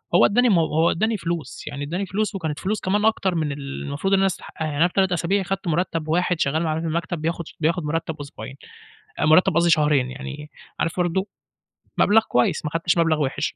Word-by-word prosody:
هو - - +7
إدّاني 245 +4 +3
مو 180 -6 +4
هو 160 +2 +2
إدّاني 220 +5 0
فلوس 170 -7 -5
يعني 145 -1 -5
إدّاني 175 +7 -3
فلوس 205 +2 -2
وكانت 160 -6 -3
فلوس 205 +7 -1
كمان 205 +3 +1
أكتر 195 -4 +1
من 155 -3 -1
المفروض 140 +5 -3
إن 195 - +5
أنا 195 - +3
استحقّها، 170 -3 -4
يعني 150 -2 -3
أنا 165 +4 +4
في 180 - -13
3 190 -1 +2
أسابيع 180 +3 +1
خَدت 195 +1 -4
مُرتّب 165 -1 -1
واحد 175 +1 +1
شغّال 155 +4 +1
معانا 160 -1 -1
في 165 - -3
المكتب 165 0 -2
بياخد 165 +1 -2
ش - - -13
بياخد 165 +2 0
مُرتّب 160 +1 -2
أسبوعين، 135 -3 -9 0.6
آآ - - +2
مُرتّب 160 +3 +5
قصدي 170 0 +3
شهرين، 150 -5 +3
يعني 145 +3 -8 0.3
عارف 165 - -1
برضه 180 +3 0 0.7
مَبلغ 220 +2 +5
كويّس 125 +5 +1
ما 150 - -2
خدّتش 170 +1 0
مَبلغ 165 -2 +2
وِحِش. 135 -2 -2
165 Hz, 215 wpm, -23 LUFS, 150-185 Hz, 0.7 s, هو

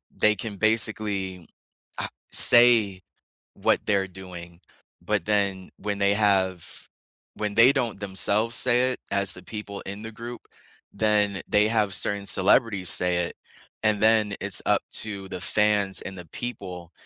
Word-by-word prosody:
they 105 0 +3
can 105 +1 -5
basically, 105 -4 0 0.5
uh, - - -2 0.3
say 115 -6 +5 0.5
what - - +2
they're 100 -2 +1
doing, 90 -2 -11 0.4
but - - -1
then, 100 -3 0
when 100 -1 -3
they 100 0 +3
have 95 -4 0 0.5
when 105 -1 -3
they 115 +4 +7
don't 120 -7 -2
themselves 105 +3 -1
say 125 +1 +2
it - - -7
as 100 -2 0
the 90 - -9
people 105 0 -7
in 100 +1 -6
the 110 - -7
group, 120 +2 -8 0.5
then 105 -2 +1
they 105 +1 +3
have 110 -3 +1
certain 100 0 -1
celebrities 100 0 +2
say 90 -1 +1
it, - - -7 0.5
and 110 -2 +2
then 110 -1 +3
it's - - -1
up - - +3
to 100 -3 -3
the 90 - -6
fans 105 0 +2
and 95 - -5
the 90 - -9
people, 90 -6 -6
100 Hz, 150 wpm, -25 LUFS, 95-110 Hz, 0.5 s, they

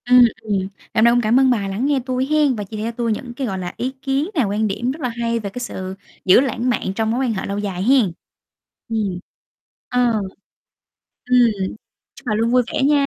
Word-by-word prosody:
Ừm, 245 - +9 0.2
ừm, 205 -3 0
ngày 190 - -4 0.2
hôm 220 - +3
nay 235 - +6
cũng 245 - +3
cảm 235 +4 +3
ơn 265 -1 +5
bà 205 -5 +1
lắng 200 +7 -2
nghe 280 -2 +2
tui 255 0 0
hén 295 -3 +2
và 210 - -4
chia 210 +2 -8
cho 230 - -2
tui 235 -1 -1
những 240 +3 -4
cái, 260 0 -3
gọi 190 -3 -3
là, 175 -1 -5
ý 255 +2 -2
kiến 275 +4 0
này, 270 -8 +3
quan 210 +2 0
điểm 235 +6 -1
rất 305 +3 -8
là 250 - 0
hay 230 0 -1
về 200 -2 -4
cái 250 - -7
sự 190 -5 -5 0.3
giữ 185 +4 +7
lãng 250 -2 0
mạn 195 -5 -1
trong 220 +1 0
mối 260 +3 0
quan 230 - 0
hệ 190 - -3
lâu 200 - -3
dài 195 -3 -3
hén. 245 -6 +4 0.8
Ừm. 205 -5 -1 0.7
Ờ. 240 -4 +2 1.1
Ừm, 250 0 +5 0.8
chúc - - -16
bà 215 - +1
luôn 230 +2 +1
vui 250 0 +4
vẻ - - 0
nha. 285 +1 +4
235 Hz, 235 wpm, -20 LUFS, 205-255 Hz, 1.1 s, Ừm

